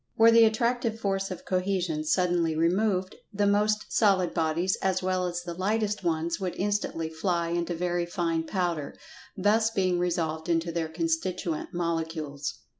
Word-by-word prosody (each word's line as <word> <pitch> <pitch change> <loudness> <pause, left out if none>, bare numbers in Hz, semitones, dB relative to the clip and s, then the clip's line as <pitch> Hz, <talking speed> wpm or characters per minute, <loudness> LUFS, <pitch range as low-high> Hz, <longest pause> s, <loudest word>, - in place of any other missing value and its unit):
Were 225 +1 +7
the 230 0 +7
Attractive 230 +1 0
force 195 -2 -1
of 185 - -7
Cohesion 185 -4 -1
suddenly 175 -1 +1
removed, 185 +3 +1
the 205 -1 0
most 210 +1 +1
solid 195 -5 +3
bodies, 165 +3 +1
as 185 -1 0
well 185 -1 0
as 175 0 -4
the 175 -1 -5
lightest 210 +3 -1
ones, 165 +1 -1
would 185 -3 -3
instantly 200 -5 -1
fly 170 +1 -1
into 175 0 -1
very 175 0 -1
fine 165 -2 -1
powder, 175 -7 -2 0.4
thus 215 +3 +3
being 185 -5 +1
resolved 165 -2 -1
into 170 0 +1
their 165 -1 -2
constituent 165 +1 -2
molecules. 160 -6 -3
175 Hz, 150 wpm, -27 LUFS, 165-195 Hz, 0.4 s, Were